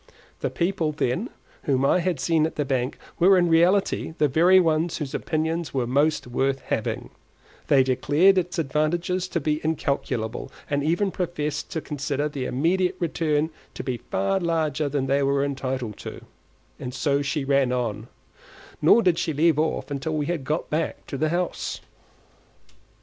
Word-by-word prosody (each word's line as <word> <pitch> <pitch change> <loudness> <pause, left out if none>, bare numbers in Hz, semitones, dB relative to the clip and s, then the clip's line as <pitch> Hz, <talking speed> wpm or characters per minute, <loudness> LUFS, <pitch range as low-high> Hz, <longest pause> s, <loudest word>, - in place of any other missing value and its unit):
The - - -1
people, 170 -3 0
then, 145 - -1 0.4
whom 135 -1 +2
I 180 - +4
had 175 -4 -1
seen 155 +3 +2
at - - -9
the 150 - -1
bank 130 -1 -1 0.2
were 190 +2 +6
in 175 -1 +3
reality 170 0 +2
the 150 - +3
very 175 +7 +5
ones 165 -1 +1
whose 145 -3 -5
opinions 160 0 -2
were 130 -2 +1
most 145 +5 +1
worth 135 +2 -1
having; - - -3 0.6
they 135 -2 +5
declared 145 +9 +4
its 180 0 -4
advantages 170 +5 0
to 170 - -1
be 150 +1 -1
incalculable, 140 -7 -2 0.2
and 145 -1 0
even 175 +6 +1
professed 170 -5 -3
to 160 - -2
consider 145 0 -2
the 140 -3 -4
immediate 175 +8 +1
return 160 -2 0 0.2
to - - -5
be 125 -2 -2
far 105 - -1
larger 160 -4 0
than 140 -1 -1
they 140 +1 +2
were 140 0 +2
entitled 130 -5 -3
to; - - -8 0.5
and 125 0 -6
so 140 +1 +1
she 145 0 -2
ran 135 -2 +2
on, 115 -3 -2 0.7
nor 220 +9 +6
did 175 -3 +3
she 160 - -1
leave 155 +1 +3
off 155 -4 0
till 155 +3 -2
we 150 -1 0
had 165 -3 -2
got 150 +5 -2
back 155 +1 -2
to - - -6
the 155 +3 0
house. 175 +2 -2
150 Hz, 165 wpm, -25 LUFS, 135-170 Hz, 0.7 s, were